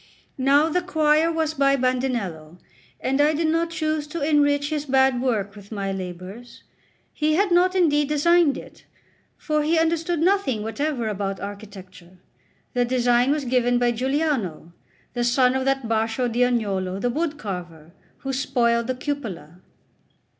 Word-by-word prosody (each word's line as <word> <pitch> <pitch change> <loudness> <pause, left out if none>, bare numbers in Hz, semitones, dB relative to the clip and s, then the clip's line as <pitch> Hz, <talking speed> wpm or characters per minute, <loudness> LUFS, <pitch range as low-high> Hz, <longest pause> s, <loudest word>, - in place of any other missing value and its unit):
Now 280 +4 +4
the 360 +3 0
choir 315 -2 +2
was 320 -1 -1
by 275 -2 +3
Bandinello, 240 - -2 0.4
and 270 +2 +1
I 300 +1 +3
did 325 +2 0
not 330 +1 +1
choose 310 -2 -2
to 305 -1 -3
enrich 290 -1 +2
his 300 -1 -2
bad 265 -2 +3
work 210 -6 -1
with 205 0 -14
my 200 -2 -3
labours. 190 +5 -8 0.5
He 310 0 +1
had 390 +2 +1
not 365 +2 +3
indeed 295 -5 +2
designed 310 0 +3
it, - - -12 0.5
for 305 -1 -1
he 315 +3 +1
understood 330 +1 0
nothing 345 - +1
whatever 250 +1 -2
about 195 -2 -3
architecture; 195 -3 -10 0.6
the 245 -2 +2
design 245 0 +2
was 290 -1 0
given 245 -1 +2
by 245 0 +2
Giuliano, 250 - -2 0.4
the 240 - -1
son 250 +1 +3
of 265 0 -1
that 270 -3 0
Baccio 225 +2 0
d'Agnolo, 215 -6 0
the 245 +4 0
wood 310 +2 -2
carver, 175 - -7 0.3
who 270 0 -3
spoiled 235 -3 +1
the 255 - -1
cupola. 220 - -6
260 Hz, 150 wpm, -23 LUFS, 220-300 Hz, 0.6 s, Now